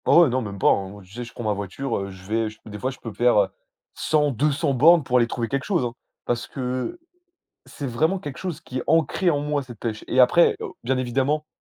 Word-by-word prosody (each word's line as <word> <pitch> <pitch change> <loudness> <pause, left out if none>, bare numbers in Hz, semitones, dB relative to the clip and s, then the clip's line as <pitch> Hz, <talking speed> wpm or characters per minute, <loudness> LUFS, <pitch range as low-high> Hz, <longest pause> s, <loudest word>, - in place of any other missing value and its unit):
Oh, 175 - +7
ouais, 160 - +3
non, 130 +1 0
même 100 -3 -6
pas, - - +4
hein. 100 +1 -2
Tu 90 - -20
sais, 120 +4 -6
je 115 - -10
prends 120 - -7
ma 105 -1 +1
voiture, 100 +7 -4
heu, 100 0 -4
je 95 0 -12
vais 110 +2 0 0.2
des 105 -1 -8
fois, 130 - -1
je 135 - -8
peux 115 -3 -8
faire, 120 0 +3
heu, 100 -2 +3 0.4
100-200 145 0 +1
bornes 160 +5 +6
pour 125 -2 +2
aller 120 -1 +3
trouver 120 0 -2
quelque 135 +2 -2
chose, 120 +1 0
hein. 120 - -3 0.3
Parce 120 0 -1
que 130 - -3 0.7
c'est 140 - -6
vraiment 160 +10 +1
quelque 145 -6 -7
chose 175 -5 -5
qui 130 -5 -6
est 125 - -2
ancré 165 +3 +2
en 145 - 0
moi, 145 -1 -1
cette 120 -4 -12
pêche 110 -2 -4
et 130 - +1
après, 150 +7 +6
heu, - - -3 0.2
bien 130 +2 0
évidemment, 135 +5 0
125 Hz, 245 wpm, -24 LUFS, 115-145 Hz, 0.7 s, Oh